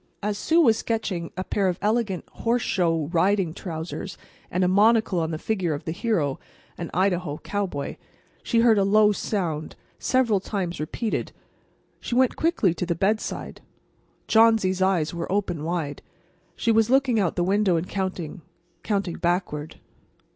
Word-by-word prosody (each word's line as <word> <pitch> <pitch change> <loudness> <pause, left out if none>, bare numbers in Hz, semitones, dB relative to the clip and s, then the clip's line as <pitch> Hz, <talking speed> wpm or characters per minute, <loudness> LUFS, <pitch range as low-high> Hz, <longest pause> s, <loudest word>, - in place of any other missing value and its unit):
As 210 0 0
Sue 325 +11 +2
was 230 -9 +5
sketching 190 -7 -2
a 185 - -1
pair 195 0 0
of 180 -1 0
elegant 210 -3 0
horseshow 180 -9 +1
riding 185 -1 +2
trousers 170 +1 -6 0.3
and 180 +1 0
a - - +3
monocle 210 0 +4
on 160 -1 -1
the 160 - -3
figure 180 -4 -1
of 145 - -8
the - - -2
hero, 170 - -1 0.4
an 170 - -6
Idaho 180 -4 0
cowboy, 195 -9 -3 0.4
she 230 -2 +2
heard 225 -3 +5
a - - +3
low 210 +1 +5
sound, 175 -7 -3 0.2
several 240 -6 +2
times 185 -3 -3
repeated. 210 +9 -3 0.7
She 240 - -4
went 255 0 +3
quickly 315 - +2
to 175 - -3
the 170 - 0
bedside. 205 +6 -2 0.7
Johnsy's 220 -5 +4
eyes 185 -5 +2
were 170 +1 -4
open 185 -6 -1
wide. 160 -3 -3 0.5
She 230 - +1
was 225 0 +3
looking 260 -3 +3
out 185 -5 0
the 175 - +1
window 195 0 +2
and 165 +2 -1
counting—counting 185 +1 -4
backward. 170 -3 -2
190 Hz, 150 wpm, -25 LUFS, 170-215 Hz, 0.7 s, was